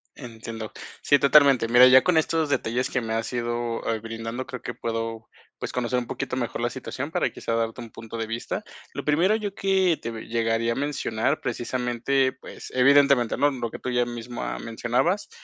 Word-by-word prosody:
Entiendo. 115 -3 -8 0.3
Sí, 145 - +4
totalmente. 140 -4 +5
Mira, 120 +2 +8
ya 130 +1 +7
con 180 -3 +3
estos 160 -1 +1
detalles 125 -1 0
que 130 - 0
me 110 -2 -3
has 115 0 -2
ido, 120 -1 -2
eh, 115 -1 0
brindando, 115 +3 -5
creo 130 -2 -7
que 125 - -5
puedo, 115 -1 -4 0.3
pues, - - -5
conocer 125 0 0
un 120 - -5
poquito 130 -1 -4
mejor 120 -3 -3
la 120 +1 0
situación 130 +3 -6
para - - +1
quizá 115 - -4
darte 115 +1 -1
un 115 -2 -8
punto 115 0 -8
de 115 -1 -3
vista. 115 +1 -4 0.3
Lo - - -6
primero 170 +8 +3
yo 205 -2 -5
que 190 -4 +2
te 115 - -4
ve 110 -1 -8
llegaría 115 0 0
a - - -7
mencionar, 135 -5 -1
precisamente, 125 +2 -1
pues, 130 - -11
evidentemente, 140 -2 +5
¿no?, 145 0 +3
lo 120 -4 -4
que - - -7
tú - - -4
ya 125 -1 +1
misma 120 0 -5
mencionabas, 120 - -1
120 Hz, 195 wpm, -25 LUFS, 115-140 Hz, 0.3 s, Mira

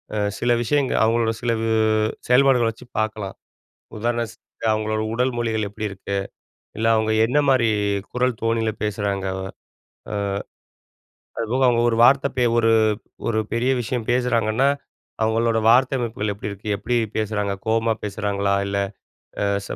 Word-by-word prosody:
அ - - -1 0.2
சில 120 - +1
விஷயங்க, 135 +3 +1
அவங்களோட 115 0 +2
சிலவு 115 -1 0 0.6
செயல்பாடுகள 125 -2 +4
வச்சு 120 +3 -13
பார்க்கலாம். 110 -3 -2 0.6
உதாரணத்திற்கு, 120 0 -4
அவங்களோட 110 0 -1
உடல் 125 +2 +1
மொழிகள் 110 -3 -1
எப்டி 105 +2 -7
இருக்கு. 100 +1 -5 0.6
இல்ல, 115 - 0
அவங்க 110 0 +1
என்ன 130 +6 +1
மாரி 125 -3 +3 0.4
குரல் 125 -1 0
தோணியில 115 -1 +1
பேசுறாங்கவ. 100 -2 -1 0.2
ஆ - - -5 2.0
அதுபோக, 120 +4 0
அவங்க 120 -1 +2
ஒரு 115 - 0
வார்த்தை 135 -2 +3
ஒரு 115 -1 +4 0.6
ஒரு 110 -1 +1 0.2
பெரிய 125 +3 +1
விஷயம் 115 0 -3
பேசுகிறாங்கன்னா 120 +1 +2 0.5
அவங்களோட 115 +1 +2
வார்த்த 130 +3 +4
அமைப்புகள் 110 -3 -2
எப்டி 100 - -7
இருக்கு. 100 +1 -10
எப்டி 120 +5 -2 0.2
பேசுகிறாங்க, 105 -2 -1
கோவமா 115 0 +2
பேசுறாங்களா? 100 -1 -1
இல்ல, 100 0 -2 0.9
ச - - -11
115 Hz, 130 wpm, -22 LUFS, 110-120 Hz, 2.0 s, செயல்பாடுகள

